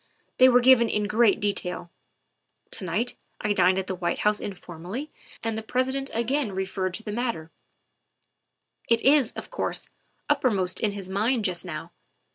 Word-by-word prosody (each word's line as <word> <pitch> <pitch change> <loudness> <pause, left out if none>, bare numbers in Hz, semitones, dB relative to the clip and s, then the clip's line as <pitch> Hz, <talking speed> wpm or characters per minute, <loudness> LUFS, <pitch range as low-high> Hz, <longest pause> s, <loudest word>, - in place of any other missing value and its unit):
They 255 0 +8
were 250 0 +5
given 240 -2 +6
in 210 - 0
great 210 0 +3
detail. 180 -4 -2 0.8
To - - -6
night 205 +8 -1 0.3
I 210 -1 0
dined 185 -1 +4
at 190 - -1
the 190 - -3
White 175 -1 -2
House 210 0 +3
informally 185 - -7 0.3
and 225 -1 -1
the 220 - -3
President 260 +4 -1
again 235 0 0
referred 190 -1 -2
to 225 - -6
the 210 - -5
matter; 225 -8 -3 1.4
it 230 -1 +4
is, 275 -3 +4
of - - -8
course, - - -3 0.4
uppermost 190 -7 +1
in 210 -2 0
his 195 -2 -6
mind 215 +4 0
just 180 -3 -1
now. 165 -4 -6
210 Hz, 160 wpm, -26 LUFS, 185-240 Hz, 1.4 s, They